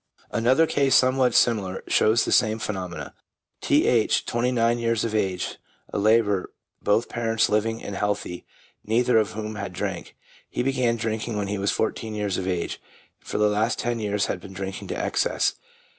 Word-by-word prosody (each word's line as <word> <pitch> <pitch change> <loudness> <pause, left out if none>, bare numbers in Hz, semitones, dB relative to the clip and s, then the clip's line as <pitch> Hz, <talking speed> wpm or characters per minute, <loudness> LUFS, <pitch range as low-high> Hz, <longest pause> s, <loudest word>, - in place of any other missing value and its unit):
Another 130 +7 +3
case, 140 -4 +2
somewhat 130 -1 +3
similar, 100 -6 +2
shows 110 +2 +3
the - - -2
same 110 -1 +3
phenomenon. 90 -8 -5 0.5
T. - - +3
H., - - +2
twenty 120 +2 0
nine 120 -1 +2
years 115 -1 0
of 115 - -3
age, 95 -4 -1 0.4
a - - 0
labourer, 105 -2 +3 0.3
both 105 +3 +2
parents 115 -1 0
living 110 +2 0
and 100 - -5
healthy, 100 -3 -2 0.4
neither 115 +1 +3
of 110 0 -1
whom 110 0 -5
had 100 -3 -5
drank. - - -4 0.3
He - - -2
began 125 -3 +1
drinking 110 -1 -3
when 100 -1 -2
fourteen 110 +1 -1
years 105 -2 -1
of 95 - -4
age, 90 -2 -2 0.4
and - - -16
for - - -2
the 105 - +4
last 105 +3 +1
ten 120 -1 -2
years 105 -2 0
had 90 - -3
been 95 +1 -10
drinking 95 0 -5
to - - -4
excess. - - +1
110 Hz, 175 wpm, -25 LUFS, 100-115 Hz, 0.5 s, the